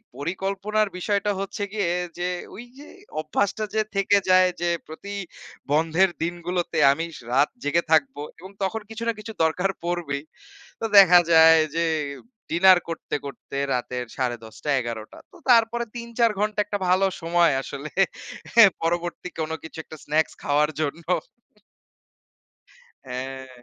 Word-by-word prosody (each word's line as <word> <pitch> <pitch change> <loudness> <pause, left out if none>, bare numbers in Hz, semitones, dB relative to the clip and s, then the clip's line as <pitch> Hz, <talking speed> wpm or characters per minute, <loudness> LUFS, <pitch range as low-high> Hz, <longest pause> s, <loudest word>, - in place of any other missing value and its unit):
পরিকল্পনার 195 +7 -1
বিষয়টা 205 +2 0
হচ্ছে 195 +1 -4
গিয়ে 200 -5 0 0.3
যে 175 - -1 0.3
ঐযে 250 +6 -12 0.3
অভ্যাসটা 200 +7 -1
যে 220 - +2
থেকে 200 +1 +3
যায়। 185 0 +6
যে 175 - +1 0.2
প্রতি 200 +6 -8 0.6
বন্ধের 165 +5 +3
দিনগুলোতে 175 +1 -3
আমি 165 +4 -1 0.3
রাত 140 +3 +4
জেগে 165 +4 +1
থাকব 140 -4 +3 0.2
এবং 190 +3 -11
তখন 220 +3 -2
কিছু 225 +1 -6
না 230 - +2
কিছু 220 +1 -8
দরকার 180 +5 +1
পড়বেই। 170 -5 -2 0.6
তো - - -4
দেখা 180 -2 +9
যায় 160 0 +8 0.2
যে 170 - +2 0.7
ডিনার 185 +2 +6
করতে, 165 -1 -5
করতে 140 0 -8 0.2
রাতের 125 0 -3
১০:৩০ 120 0 -4
১১:০০ 115 -2 -6
তো - - -16
তারপরে 235 0 +4
৩-৪ 235 -1 +1
ঘন্টা 210 0 -1
একটা 205 0 -3
ভালো 185 +2 +4 0.2
সময় 170 -1 +3
আসলে 140 +3 -7 0.9
পরবর্তী 175 +1 -2
কোনো 160 0 -2
কিছু 160 0 -10
একটা 155 - -11
স্নাকস 155 +1 +1
খাওয়ার 150 +1 +2
জন্য। 155 +2 -3 2.0
হ্যাঁ। 130 +1 -6
175 Hz, 130 wpm, -24 LUFS, 150-200 Hz, 2.0 s, দেখা